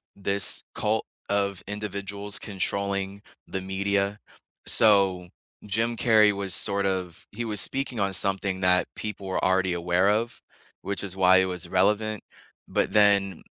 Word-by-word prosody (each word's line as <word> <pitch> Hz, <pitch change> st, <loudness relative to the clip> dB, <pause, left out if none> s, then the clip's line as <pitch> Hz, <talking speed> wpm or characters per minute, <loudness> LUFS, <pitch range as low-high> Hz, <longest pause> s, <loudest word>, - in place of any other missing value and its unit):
this 100 Hz, 0 st, 0 dB
cult -, -, 0 dB, 0.2 s
of 100 Hz, -2 st, 0 dB
individuals 100 Hz, 0 st, -4 dB
controlling 100 Hz, 0 st, -2 dB, 0.3 s
the 95 Hz, -, -4 dB
media. 100 Hz, +2 st, -1 dB, 0.5 s
So, 95 Hz, -4 st, +4 dB, 0.4 s
Jim 115 Hz, +3 st, 0 dB
Carrey 110 Hz, -3 st, +5 dB
was 100 Hz, -3 st, -3 dB
sort 100 Hz, +2 st, 0 dB
of 95 Hz, -3 st, -3 dB
he 115 Hz, +4 st, -5 dB
was 105 Hz, -2 st, -1 dB
speaking 135 Hz, -3 st, -1 dB
on 100 Hz, -1 st, 0 dB
something 95 Hz, 0 st, 0 dB
that 90 Hz, -1 st, +3 dB
people 105 Hz, -2 st, -6 dB
were 95 Hz, -, -2 dB
already 95 Hz, -1 st, +2 dB
aware 90 Hz, +2 st, +1 dB
of, 110 Hz, +3 st, -1 dB, 0.4 s
which 100 Hz, 0 st, -4 dB
is 95 Hz, -2 st, -4 dB
why 95 Hz, 0 st, +6 dB
it 95 Hz, -, +4 dB
was 90 Hz, -1 st, -4 dB
relevant, 105 Hz, +3 st, +1 dB, 0.5 s
but -, -, 0 dB
then 100 Hz, -4 st, +4 dB
100 Hz, 140 wpm, -25 LUFS, 95-105 Hz, 0.5 s, why